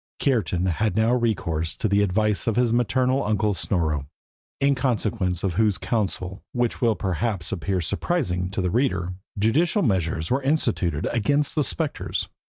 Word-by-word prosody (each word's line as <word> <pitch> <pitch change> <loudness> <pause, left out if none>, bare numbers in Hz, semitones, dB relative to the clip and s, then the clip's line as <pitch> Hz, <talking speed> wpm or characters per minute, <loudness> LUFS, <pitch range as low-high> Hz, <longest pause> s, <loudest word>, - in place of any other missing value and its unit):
Kiartan 95 - +1
had 95 +2 0
now 110 +2 +3
recourse 90 -10 0
to - - 0
the 100 0 +3
advice 105 +2 +1
of 115 - +2
his 120 -2 +2
maternal 130 +3 +2
uncle 105 0 +1
Snorro, 80 -7 -1 0.5
in 140 0 +3
consequence 110 -8 -1
of 95 -3 0
whose 105 0 +2
counsel, 95 -4 -2
which 120 -2 -1
will 115 -3 +3
perhaps 95 -2 -2
appear 95 +1 -1
surprising 90 - -1
to 95 0 -2
the 90 - 0
reader, 95 -8 0 0.2
judicial 155 - +2
measures 85 -5 0
were 135 +2 +2
instituted 115 - 0
against 140 +6 +1
the 150 - +2
spectres. 95 -9 -2
105 Hz, 155 wpm, -24 LUFS, 90-120 Hz, 0.5 s, now